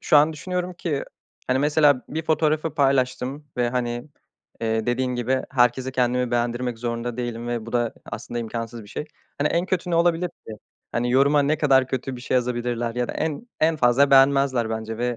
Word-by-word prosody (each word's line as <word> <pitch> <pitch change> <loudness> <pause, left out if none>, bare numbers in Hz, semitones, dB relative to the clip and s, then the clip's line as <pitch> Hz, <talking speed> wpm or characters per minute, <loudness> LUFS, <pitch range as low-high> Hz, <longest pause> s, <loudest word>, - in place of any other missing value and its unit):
şu 155 - +4
an 150 +2 +5
düşünüyorum 180 +3 -4
ki, 160 -5 -3 0.4
hani, 130 +1 +2
mesela 145 -2 +4
bir 160 +2 -3
fotoğrafı 155 -1 +1
paylaştım 135 0 +1
ve, 120 -1 +1
hani, 120 +2 -2 0.5
eee, 110 0 -1
dediğin 125 +1 0
gibi 125 +2 0
herkese 125 0 +2
kendimi 125 -1 +1
beğendirmek 120 0 -1
zorunda 115 0 -3
değilim 120 -1 -4
ve 120 -2 -3
bu 115 - -8
da 120 -2 0
aslında 120 +1 -5
imkânsız 115 0 -5
bir 105 - -15
şey. 150 - -5 0.3
Hani, 145 +1 +2
en 170 +2 0
kötü 180 -1 -1
ne 170 - +1
olabilir 170 +1 +2 0.2
ki? - - -7 0.4
Hani, 120 +1 0
yoruma 140 +3 +4
ne 150 +2 +1
kadar 135 -4 +4
kötü 130 0 -3
bir 120 - -10
şey 130 - -2
yazabilirler 120 -1 -1
ya 125 0 -1
da - - -3
en 160 +9 -3
en 160 +1 +3
fazla 135 +1 +4
beğenmezler, 135 -3 +4
bence 110 0 -4
ve, 120 0 -1
125 Hz, 190 wpm, -24 LUFS, 120-145 Hz, 0.5 s, an